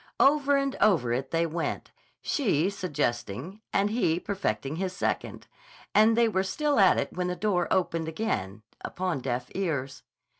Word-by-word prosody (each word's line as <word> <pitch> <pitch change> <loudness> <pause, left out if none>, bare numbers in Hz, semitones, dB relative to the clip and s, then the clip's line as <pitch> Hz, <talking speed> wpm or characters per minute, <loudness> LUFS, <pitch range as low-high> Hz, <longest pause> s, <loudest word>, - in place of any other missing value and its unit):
Over 285 0 +4
and 275 -1 -1
over 150 - +3
it 130 +2 -2
they 165 0 +1
went, 165 +1 -3 0.3
she 195 - +1
suggesting, 145 - -3
and 200 +1 +1
he 175 -8 +1
perfecting 155 - -2
his 185 0 -2
second; 185 - -3 0.5
and 220 +2 +5
they 235 -1 +5
were 190 -4 +1
still 290 +8 0
at 190 -2 +6
it - - -2
when 180 0 -1
the 180 - -2
door 180 -2 0
opened 165 -3 0
again, 110 - -3 0.2
upon 180 -5 -2
deaf 125 -1 -3
ears. 145 -8 -2
180 Hz, 155 wpm, -27 LUFS, 140-210 Hz, 0.5 s, at